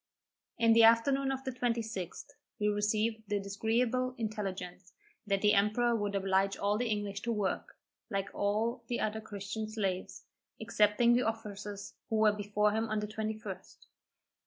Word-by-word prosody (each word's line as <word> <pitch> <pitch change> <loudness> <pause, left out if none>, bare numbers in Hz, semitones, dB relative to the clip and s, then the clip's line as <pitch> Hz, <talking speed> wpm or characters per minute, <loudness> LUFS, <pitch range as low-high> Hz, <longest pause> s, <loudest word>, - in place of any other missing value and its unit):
In 230 0 +5
the 230 - +6
afternoon 270 +5 +5
of 265 0 -4
the 260 - -3
26th, 230 -7 -3 0.3
we 210 0 +2
received 215 +2 0
the 205 0 0
disagreeable 230 +5 0
intelligence, 195 -5 -5 0.3
that 195 0 0
the 210 0 +5
emperor 215 +4 +3
would 205 -2 -1
oblige 195 0 +1
all 205 +1 +1
the 245 -1 0
English 205 -1 -2
to 235 - -2
work, 210 -4 -2 0.3
like 195 -3 -2
all 220 +4 0
the 240 - -2
other 220 +1 -1
Christian 215 +1 -5
slaves, 195 -4 -3 0.4
excepting 220 +1 +3
the 245 - +4
officers 205 -2 -5 0.2
who 225 - 0
were 215 -1 +5
before 210 0 +1
him 220 +1 -1
on 215 0 0
the 210 - -2
21st. 215 -3 -5
215 Hz, 155 wpm, -32 LUFS, 200-230 Hz, 0.4 s, the